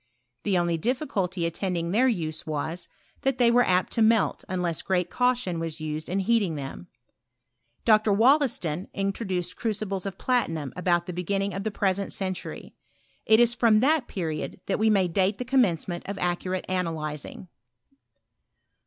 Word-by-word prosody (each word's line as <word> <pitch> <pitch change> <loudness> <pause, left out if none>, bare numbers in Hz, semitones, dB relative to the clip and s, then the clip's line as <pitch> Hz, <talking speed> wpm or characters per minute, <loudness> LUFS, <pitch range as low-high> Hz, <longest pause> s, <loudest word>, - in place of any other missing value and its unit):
The 200 -3 +1
only 170 -1 +1
difficulty 195 - -1
attend 180 +2 -2
ing 170 0 -2
their 245 +7 +4
use 160 -10 -2
was, 155 +3 -3 0.3
that 270 -2 +1
they 240 -2 +5
were 245 +1 +5
apt 185 -3 +1
to 230 - 0
melt 225 0 +3
unless 180 -3 -1
great 180 -2 0
caution 245 -9 +1
was 165 -1 -4
used 155 0 -4
in 195 +2 0
heating 200 -5 +1
them. 140 +5 -7 1.0
Dr. 215 -1 +4
Wollaston 220 - +2
introduced 190 -3 -2
crucibles 205 -3 -2
of 195 -1 -6
platinum 165 - -1
about 175 -1 +1
the 180 - -5
beginning 195 +3 -1
of 195 +2 -4
the 220 - -1
present 200 -1 -1
century. 185 -2 -4 0.5
It 220 0 +6
is 240 0 +4
from 230 -3 +4
that 290 -1 +2
period 160 -4 -4
that 195 - -1
we 220 +1 +3
may 195 -4 +3
date 190 +4 +1
the 250 - -4
commencement 190 - +1
of 200 - -4
accurate 180 +1 -2
analyzing. 165 -2 -3
190 Hz, 155 wpm, -26 LUFS, 175-220 Hz, 1.0 s, It